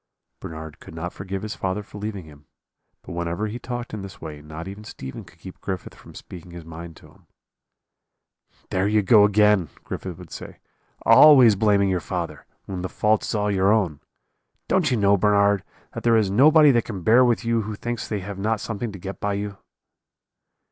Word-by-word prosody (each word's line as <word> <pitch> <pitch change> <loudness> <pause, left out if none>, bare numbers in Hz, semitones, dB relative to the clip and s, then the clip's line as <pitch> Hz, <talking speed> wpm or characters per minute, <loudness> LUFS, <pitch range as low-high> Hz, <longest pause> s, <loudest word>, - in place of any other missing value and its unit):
"Bernard 80 -1 -8
could 80 - -12
not 85 +2 -5
forgive 95 0 -6
his 110 0 -4
father 95 +2 -3
for 105 - -11
leaving 100 -4 -5
him; 75 -2 -17 0.6
but - - -10
whenever 85 +4 -2
he 110 +3 -5
talked 120 -1 -6
in 105 - -4
this 95 -1 -10
way 75 -2 -8
not 80 +3 -8
even 100 +2 -8
Stephen 65 0 -8
could 90 -2 -19
keep 90 +2 -12
Griffith 95 -2 -5
from - - -16
speaking 90 -1 -11
his 85 -1 -10
mind 85 0 -9
to - - -17
him. - - -25 1.4
"'There 95 +1 +1
you 105 0 +2
go 105 +1 +6
again,' 105 -4 +3
Griffith 90 -3 -6
would 90 -3 -13
say; - - -9 0.5
'always 125 -2 +8
blaming 100 -1 +3
your 90 -1 0
father, - - -5 0.2
when 95 -2 -5
the 95 - -4
fault 105 0 +1
is - - -3
all 105 0 0
your 95 0 +3
own. 95 -10 +1 0.7
Don't 180 -5 +2
you 125 - +1
know, 100 -1 +4
Bernard, 100 0 +3 0.3
that - - -5
there 115 -1 +4
is 105 -3 +1
nobody 150 +6 +6
that 120 -3 +1
can 95 -6 -6
bear 120 +6 +6
with 120 -2 +1
you 115 -1 +1
who 105 0 -5
thinks 120 +2 -4
they 105 -3 -3
have 100 +1 -7
not 110 +2 0
something 110 +1 -4
to 100 - -9
get 95 0 -7
by 100 0 -1
you?' 100 0 -5
100 Hz, 200 wpm, -23 LUFS, 90-110 Hz, 1.4 s, always